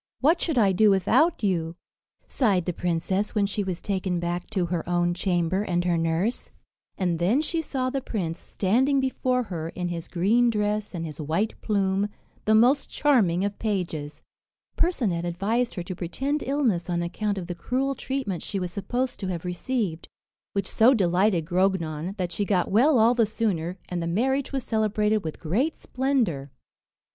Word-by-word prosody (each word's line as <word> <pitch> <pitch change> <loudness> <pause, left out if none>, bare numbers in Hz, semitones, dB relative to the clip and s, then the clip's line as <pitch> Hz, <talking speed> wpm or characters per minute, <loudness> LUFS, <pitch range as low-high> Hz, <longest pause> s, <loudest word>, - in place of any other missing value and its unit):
What 320 +6 +3
should 320 -6 0
I 205 -4 +5
do 210 +3 +4
without 205 - +3
you!" 170 -4 0 0.5
sighed 200 - +1
the 180 - -1
princess, 180 +5 -1
when 205 -2 +3
she 200 +1 -2
was 185 -2 -4
taken 185 -3 -1
back 175 +1 -3
to 190 -5 0
her 170 -1 -2
own 175 0 +2
chamber 180 0 0
and 175 -4 -1
her 175 -1 +2
nurse. 165 +7 -1 0.5
And 175 -3 0
then 195 +10 +3
she 325 +2 -1
saw 255 -4 -2
the 275 0 -2
prince 175 -9 -3
standing 260 +8 +1
before 255 -1 0
her, 165 -6 -5
in 175 +1 -4
his 170 -1 -5
green 220 +7 +3
dress 210 -2 -1
and 165 -1 -3
his 155 -1 -7
white 165 +9 0
plume, 200 -1 +1 0.4
the 220 - +4
most 255 +6 +4
charming 200 - +2
of 205 0 -4
pages. 165 -8 -3 0.5
Percinet 230 - 0
advised 205 +8 -1
her 175 - -3
to 185 +1 -6
pretend 270 - -2
illness 240 -11 0
on 170 -1 0
account 200 +4 -2
of 185 - -4
the 175 - -4
cruel 260 +10 -1
treatment 265 -10 -3
she 200 - -4
was 180 -1 -3
supposed 245 +7 -2
to 195 - -3
have 180 -2 -4
received; 180 -1 -2 0.5
which 200 -2 -1
so 235 +7 +4
delighted 185 -3 +2
Grognon, 175 -1 0
that 180 -2 -2
she 205 - -1
got 190 -3 +1
well 255 +8 +5
all 230 +2 +5
the 230 -3 +2
sooner, 190 -5 -1
and 180 -1 -3
the 170 - -2
marriage 265 +10 0
was 270 -2 -2
celebrated 215 -2 +1
with 160 -1 -5
great 230 - 0
splendour. 240 - -1
195 Hz, 175 wpm, -26 LUFS, 175-235 Hz, 0.5 s, I